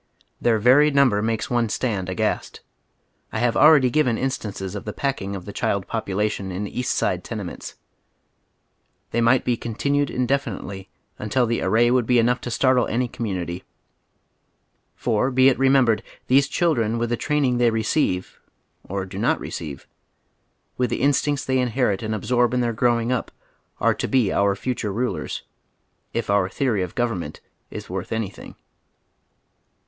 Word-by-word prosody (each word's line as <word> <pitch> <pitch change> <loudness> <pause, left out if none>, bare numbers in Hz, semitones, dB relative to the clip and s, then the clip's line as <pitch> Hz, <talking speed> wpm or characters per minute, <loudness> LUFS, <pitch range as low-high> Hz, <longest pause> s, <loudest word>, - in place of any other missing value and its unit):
Their 115 -2 +3
very 130 +7 +5
number 135 -8 +3
makes 110 0 -1
one 120 -2 +1
stand 105 -6 -2
aghast. 90 - -2 0.7
I - - -3
have 120 +1 +1
already 145 -5 +6
given 125 -5 +2
instances 105 -8 -3
of 105 - -5
the 105 - -5
packing 105 -8 -2
of 90 -2 -7
the 100 - -8
child 100 -1 -1
population 105 -2 -2
in 100 +3 -3
East 125 +4 -2
Side - - 0
tenements. - - -6 1.4
They 120 - +1
might 120 +2 +3
be 125 - +2
continued 140 +5 -1
indefinitely 125 -7 -2 0.3
nntil 120 +4 +1
the 115 - -1
array 115 +5 +3
would 125 -3 +2
be 125 - +4
enough 120 +1 +2
to - - -5
startle 125 +1 +2
any 125 +2 0
commonity. 95 -7 -4 1.3
For, 120 +2 0
be 130 0 +5
it 130 - 0
remem 135 -1 +5
bered, 115 -2 +2 0.2
these 140 +2 +4
children 120 -10 +1
with 120 0 -1
the - - +2
training 135 -2 0
they 120 -1 +4
receive 110 -4 -1 0.3
— - - -46
or 95 0 -2
do 95 +1 -7
not 115 - +1
receive— 75 -5 -6 0.9
with 125 -1 +1
the - - -2
instincts 145 0 +1
they 130 0 +1
inherit 120 -4 0
and 110 -1 -2
absorb 120 +3 +1
in 125 - +2
their 120 -1 0
growing 120 0 +1
up, 125 - -1 0.5
are - - +3
to - - -3
be 125 -7 +2
our 100 0 +2
future 115 -1 -3
rnlers, 105 -6 -3 0.7
if 115 - -2
onr 100 -2 +1
theory 120 -8 0
of 90 -2 -4
government 110 -11 -2 0.3
is - - -8
worth - - -5
anything. 110 -3 -5
115 Hz, 160 wpm, -23 LUFS, 105-130 Hz, 1.4 s, already